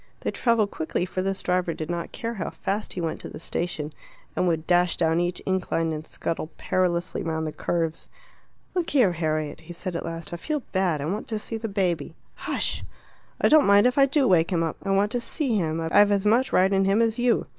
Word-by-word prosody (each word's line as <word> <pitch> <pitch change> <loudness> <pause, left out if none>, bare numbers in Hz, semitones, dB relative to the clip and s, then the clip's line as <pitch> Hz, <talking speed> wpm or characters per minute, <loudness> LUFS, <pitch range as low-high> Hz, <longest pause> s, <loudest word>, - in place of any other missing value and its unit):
They - - -1
travelled 230 -4 +2
quickly, 160 +3 -2
for 185 0 -3
this 195 0 -2
driver 180 -2 0
did 160 +2 -4
not 170 -1 -3
care 230 0 -4
how 190 -7 -3
fast 200 +2 -3
he 180 - -4
went 165 -1 -3
to - - -7
the - - -9
station, 160 -2 -3 0.4
and 180 - +1
would 165 -2 0
dash 175 0 +3
down 165 0 +2
each 175 +1 -1
incline 175 -3 0
and 155 0 -4
scuttle 160 0 -4
perilously 180 -1 0
round 160 -1 -2
the 155 - -3
curves. 165 0 -2 0.6
"Look 355 -3 -1
here, 245 -10 +4
Harriet," 155 -3 -2
he 175 +2 -10
said 180 +1 -5
at - - -2
last, 165 0 -6
"I - - -3
feel 300 - -3
bad; 180 -6 +1
I - - -2
want 195 +7 -3
to 220 - -2
see 225 +1 -5
the 225 0 -4
baby." 175 -6 -1 0.2
"Hush!" - - -2 0.6
"I - - +4
don't 310 -5 +6
mind 200 +2 +6
if 250 +3 +3
I 275 - +7
do 275 -1 +2
wake 170 -3 +4
him 170 -2 +2
up. 160 - -2
I 195 - -5
want 200 +2 +2
to 245 - -1
see 265 -2 -1
him. 165 -5 0
I've 200 +6 +4
as 200 0 +1
much 235 +5 +3
right 190 +2 +4
in 195 0 +3
him 195 +3 +3
as 225 +1 0
you." 240 -1 +2
180 Hz, 230 wpm, -25 LUFS, 165-210 Hz, 0.6 s, I